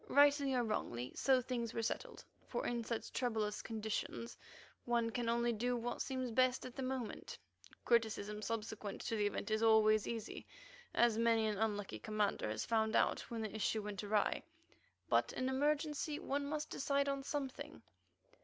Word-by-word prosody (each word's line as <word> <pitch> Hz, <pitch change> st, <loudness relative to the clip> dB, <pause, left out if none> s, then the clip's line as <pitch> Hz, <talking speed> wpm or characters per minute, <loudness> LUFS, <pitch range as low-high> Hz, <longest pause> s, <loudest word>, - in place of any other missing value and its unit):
Rightly 285 Hz, -1 st, +5 dB
or 245 Hz, -, +2 dB
wrongly, 125 Hz, -, -2 dB
so 265 Hz, -2 st, +3 dB
things 240 Hz, -2 st, -3 dB
were 230 Hz, -, 0 dB
settled, -, -, -3 dB, 0.2 s
for -, -, -2 dB
in 240 Hz, -1 st, -1 dB
such 230 Hz, 0 st, -4 dB
troublous 220 Hz, -4 st, 0 dB
conditions 220 Hz, +1 st, -3 dB, 0.5 s
one 235 Hz, -1 st, +1 dB
can 235 Hz, 0 st, -1 dB
only 235 Hz, 0 st, +2 dB
do 245 Hz, +3 st, 0 dB
what 240 Hz, +1 st, -3 dB
seems 255 Hz, -2 st, -2 dB
best 255 Hz, +2 st, +3 dB
at 255 Hz, -, -8 dB
the -, -, -4 dB
moment. 255 Hz, -3 st, -4 dB, 0.5 s
Criticism 215 Hz, -3 st, +1 dB
subsequent 215 Hz, -2 st, -4 dB
to 225 Hz, -, -2 dB
the 210 Hz, -1 st, +2 dB
event 205 Hz, +1 st, -3 dB
is 215 Hz, 0 st, +2 dB
always 215 Hz, -1 st, +5 dB
easy, 225 Hz, -2 st, -5 dB, 0.5 s
as 235 Hz, -2 st, +4 dB
many 230 Hz, -1 st, +4 dB
an 210 Hz, -2 st, -1 dB
unlucky 205 Hz, -2 st, -1 dB
commander 210 Hz, -, 0 dB
has 110 Hz, 0 st, -2 dB
found 220 Hz, -1 st, +2 dB
out -, -, +3 dB
when 230 Hz, -2 st, -3 dB
the 215 Hz, 0 st, -4 dB
issue 215 Hz, 0 st, 0 dB
went 205 Hz, -2 st, -4 dB
awry, 205 Hz, 0 st, +1 dB, 0.7 s
but -, -, +2 dB
in 255 Hz, -, -1 dB
emergency 295 Hz, +2 st, 0 dB
one 280 Hz, -1 st, -2 dB
must 305 Hz, +1 st, -3 dB
decide 280 Hz, 0 st, +1 dB
on 275 Hz, 0 st, 0 dB
something. 275 Hz, -1 st, -4 dB
230 Hz, 165 wpm, -37 LUFS, 215-255 Hz, 0.7 s, Rightly